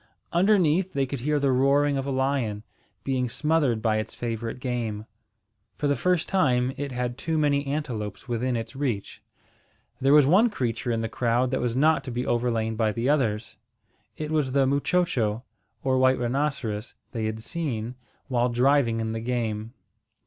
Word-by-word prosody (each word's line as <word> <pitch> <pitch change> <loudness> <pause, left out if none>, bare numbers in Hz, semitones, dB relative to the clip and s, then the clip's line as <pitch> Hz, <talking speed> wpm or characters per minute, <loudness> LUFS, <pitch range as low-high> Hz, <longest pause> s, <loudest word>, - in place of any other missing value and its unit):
Underneath, 185 -1 +3
they 140 -1 +1
could 135 0 -5
hear 150 +4 +1
the 140 -1 +2
roaring 140 +2 +3
of 135 0 -2
a - - -1
lion, 130 -6 -1 0.4
being 130 -2 0
smothered 145 -4 +1
by 110 -2 +2
its 110 +1 -4
favourite 115 0 -4
game. 115 -4 -3 0.7
For - - -2
the 140 - +2
first 180 +5 +1
time, 130 -8 +2
it 145 -1 -4
had 125 0 -3
too 160 +2 -1
many 145 -2 +1
antelopes 125 -8 -4
within 120 +1 -1
its 115 +1 -5
reach. 125 -8 -3 0.8
There 135 +1 +3
was 150 -1 +7
one 195 - +5
creature 120 - -2
in 115 -1 0
the 115 - -1
crowd 120 +2 0
that 130 - 0
was 120 -1 -1
not 155 +4 +3
to 130 - -5
be 125 +2 -2
overlain 115 -2 0
by 110 -1 +1
the 115 +5 -1
others. 115 -7 0 0.6
It 155 0 -4
was 150 -5 0
the 135 -1 +4
muchocho, 135 -6 +1 0.4
or 130 -1 +2
white 130 0 +4
rhinoceros, 120 -4 -2 0.2
they 115 -2 -3
had 110 0 -3
seen 125 -8 -3 0.3
while 125 -2 +1
driving 120 -1 +2
in 110 0 -2
the 115 - -3
game. 115 -1 -3
130 Hz, 170 wpm, -26 LUFS, 115-145 Hz, 0.8 s, was